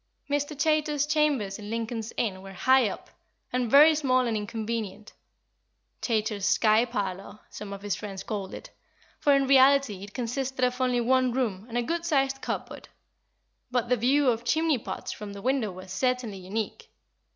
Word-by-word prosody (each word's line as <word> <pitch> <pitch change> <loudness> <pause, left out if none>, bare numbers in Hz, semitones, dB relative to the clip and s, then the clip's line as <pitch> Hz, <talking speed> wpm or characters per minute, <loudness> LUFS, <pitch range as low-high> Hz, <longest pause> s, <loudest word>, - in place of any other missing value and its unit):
Mr. 290 +1 -2
Chaytor's 300 -1 +2
chambers 290 -10 +1
in 210 0 -8
Lincoln's 230 0 -3
Inn 190 -5 -1
were 195 0 -10
high 260 +4 +4
up, - - -9 0.4
and 250 -2 0
very 295 +5 +8
small 255 -4 +2
and 230 -2 -1
inconvenient 215 -1 -4 0.9
"Chaytor's 215 -3 -1
sky 220 +2 +4
parlour," 200 -4 -4
some 210 -1 -8
of 200 0 -8
his 205 -2 -1
friends 195 -2 -6
called 200 -3 -4
it, - - -11 0.5
for 285 -1 +4
in 275 0 +2
reality 270 -6 +4
it 205 - -11
consisted 255 +1 -1
of 250 +1 -2
only 250 -1 +2
one 255 +1 +2
room 225 -5 -2
and 235 - -3
a 240 - +1
good 335 +6 -2
sized 270 -4 +1
cupboard; - - -5 0.8
but 245 -1 -1
the 250 - +4
view 260 +4 +3
of 230 0 -3
chimney 315 +3 +1
pots - - -6
from 205 -1 -7
the 200 - -8
window 255 -5 0
was 185 +1 -9
certainly 250 -3 -1
unique. 200 +4 -5
240 Hz, 170 wpm, -27 LUFS, 210-270 Hz, 0.9 s, very